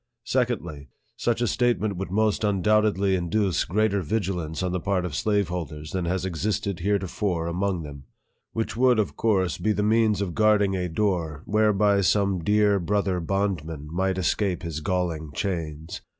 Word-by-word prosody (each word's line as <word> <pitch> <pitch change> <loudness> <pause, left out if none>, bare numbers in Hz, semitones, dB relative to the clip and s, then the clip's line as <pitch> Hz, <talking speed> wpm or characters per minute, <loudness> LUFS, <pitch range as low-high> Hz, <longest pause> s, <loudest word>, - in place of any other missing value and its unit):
Secondly, 100 - -2 0.3
such 120 0 0
a 120 - +2
statement 115 -4 +1
would 95 +1 -4
most 105 +2 +1
undoubt 105 +1 +3
edly 95 -1 +1
induce 90 +1 0
greater 100 +2 +1
vigilance 90 -4 -2
on 90 - -1
the 90 - -1
part 90 +1 0
of 85 - -4
slave 100 +3 +1
holders 75 -4 -5
than 90 -2 -2
has 90 +2 -1
existed 95 +1 -2
heretofore 95 -2 -1
among 90 +1 -1
them; 70 -2 -9 0.5
which 115 -1 -3
would, 125 0 +4
of 95 -10 0
course, 95 -6 +1
be 110 - +1
the 105 - -1
means 110 -1 +3
of 95 -4 -2
guarding 105 -2 +3
a 90 -1 -2
door 80 -5 -1
whereby 105 -1 +3
some 100 -2 +1
dear 105 +1 +3
brother 95 0 0
bondrrian 80 -5 -2
might 95 +2 0
escape 95 0 0
his 80 -2 -4
galling 80 -3 -2
chains. 80 -5 -4
95 Hz, 165 wpm, -25 LUFS, 85-105 Hz, 0.5 s, would